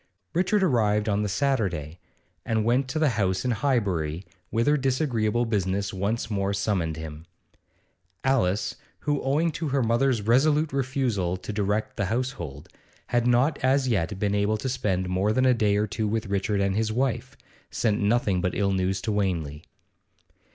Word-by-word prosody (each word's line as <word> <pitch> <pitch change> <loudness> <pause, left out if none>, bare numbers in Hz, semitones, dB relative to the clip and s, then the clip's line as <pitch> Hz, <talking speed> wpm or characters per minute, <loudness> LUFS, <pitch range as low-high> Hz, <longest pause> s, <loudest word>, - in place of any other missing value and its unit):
Richard 190 +3 +2
arrived 105 - +2
in - - +2
town 100 - +1
on - - 0
the 105 - -1
Saturday, 95 - -1 0.4
and 110 -1 0
went 125 +3 +2
to 135 - -3
the 155 -2 +3
house 95 +3 0
in 125 - +1
Highbury, 100 - 0 0.2
whither 120 +7 +2
disagreeable 125 -4 0
business 100 -2 -1
once 100 +5 -1
more 100 -1 0
summoned 95 -6 -1
him. 80 0 -8 1.0
Alice, 115 -7 +1 0.2
who, 145 -1 0
owing 150 +5 +1
to 155 +1 -4
her 135 -2 +1
mother's 120 0 +2
resolute 145 +6 +3
refusal 125 -10 0
to 105 - -6
direct 105 +1 -1
the 100 - 0
household, 95 - -3 0.4
had 120 0 +1
not 125 +5 +3
as 130 +1 +3
yet 100 -3 0
been 100 0 0
able 105 +1 +1
to 130 +5 -3
spend 95 -7 -1
more 95 +4 +1
than 130 +3 +2
a 130 - +5
day 105 -4 +2
or 105 - +2
two 105 +1 -2
with 110 +2 -1
Richard 100 +1 0
and 100 0 +1
his 110 0 0
wife, 130 +2 -1 0.3
sent 110 -3 0
nothing 100 -3 +2
but 90 - -1
ill 100 -1 +1
news 95 0 0
to 110 - -2
Wanley. 85 -7 -2
110 Hz, 170 wpm, -26 LUFS, 95-130 Hz, 1.0 s, a